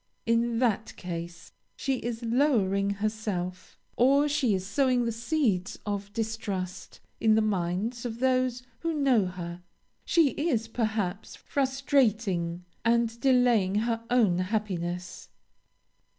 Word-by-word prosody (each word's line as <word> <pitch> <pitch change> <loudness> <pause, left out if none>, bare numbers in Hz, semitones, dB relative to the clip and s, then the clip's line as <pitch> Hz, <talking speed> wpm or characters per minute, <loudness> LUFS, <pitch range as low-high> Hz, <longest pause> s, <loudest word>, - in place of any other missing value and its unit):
In 230 0 +2
that 225 -3 0
case, 170 -1 -7 0.2
she 270 -2 -1
is 235 0 -4
lowering 225 -6 +2
herself, 200 -3 -3 0.2
or 280 +4 +4
she 280 -8 +2
is 185 0 -3
sowing 250 +3 +2
the 230 - 0
seeds 230 - 0
of 205 -1 -3
distrust 205 -5 -4 0.2
in 220 -1 +4
the 220 - +4
minds 205 +4 -1
of 230 -2 -4
those 255 -1 +1 0.2
who 330 -1 -2
know 260 -9 +3
her 175 -1 -6 0.4
she 330 -4 +4
is, 265 -8 -1
perhaps, 215 -4 -2
frustrating 230 - 0 0.2
and 230 0 +2
delaying 245 -7 +3
her 230 +1 0
own 220 -8 +3
happiness. 185 -3 -3
225 Hz, 120 wpm, -28 LUFS, 190-250 Hz, 0.4 s, or